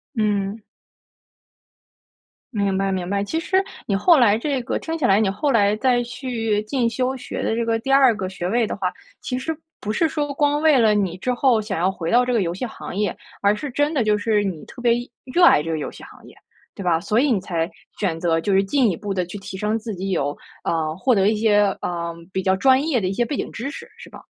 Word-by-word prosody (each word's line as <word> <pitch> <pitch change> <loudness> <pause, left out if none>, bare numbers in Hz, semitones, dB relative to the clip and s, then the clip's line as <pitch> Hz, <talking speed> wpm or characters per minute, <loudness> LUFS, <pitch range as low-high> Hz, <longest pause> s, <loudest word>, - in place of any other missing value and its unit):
嗯。 210 -1 0 1.9
明 200 -3 0
白 195 0 0
明 185 -2 -3
白。 200 0 0
其 320 +11 -2
实， 380 +3 +1 0.2
你 200 - 0
后 330 - +5
来 215 -4 +5
这 270 +2 -1
个 - - -2
听 325 0 -4
起 305 - -1
来， 195 -3 +4
你 210 - +2
后 210 +9 0
来 205 -3 +3
再 245 0 +2
去 235 -4 -2
进 235 +1 0
修 255 +3 -1
学 250 - -6
的 - - 0
这 235 0 -1
个 225 0 +1
第 270 +4 -3
2 265 -4 +6
个 190 -2 -3
学 185 -2 -4
位 230 +2 +1
的 - - -3
话， 185 -2 -1 0.3
其 250 -1 -3
实 320 +4 -3 0.2
不 210 - -3
是 325 +9 +2
说， 290 -2 -2
光 290 +1 +1
为 310 -3 +5
了 220 -3 +4
你 190 -4 0
之 250 +7 -1
后 245 -3 +3
想 210 -4 -3
要 180 +2 +2
回 170 -3 -4
到 245 +1 +4
这 250 - 0
个 230 - +2
游 170 -2 -1
戏 190 +8 -4
行 225 - -8
业。 205 -2 -1 0.3
而 205 +1 +3
是 275 +6 -5
真 290 +4 +1
的 270 -6 +1
就 210 -1 +2
是， 210 0 +1
你 185 -6 -4
特 245 - -12
别 240 -1 +3 0.4
热 350 0 +6
爱 150 - +6
这 165 - -3
个 160 - -1
游 150 - -4
戏 - - -13
行 - - -15
业， - - -16 0.4
对 200 - -6
吧？ 170 -2 +2
所 210 +5 +1
以 285 -1 +2
你 215 - +2
才 170 -2 -2 0.3
选 170 -5 -1
择 165 -1 +1
就 200 +4 0
是 190 - +5
进 250 +3 +2
一 170 - -4
步 205 -1 -4
地 180 -2 -1
去 180 +4 -8
提 195 -1 -8
升 210 +3 -1
自 220 -2 -6
己 190 +2 -4
有， 145 -5 -1 0.3
呃， 160 -2 0
获 250 +5 +2
得 195 0 +3
一 220 - +1
些， 210 -1 +3 0.2
呃， 170 -1 -3 0.2
比 190 - -1
较 190 - +3
专 260 +7 +4
业 300 -7 +1
的 190 - -1
一 190 - -1
些 240 - +1
背 275 +4 -3
景 - - -3
知 270 +5 -5
识， - - -9
是 - - -12
吧？ - - -12
215 Hz, 270 characters per minute, -22 LUFS, 190-255 Hz, 1.9 s, 2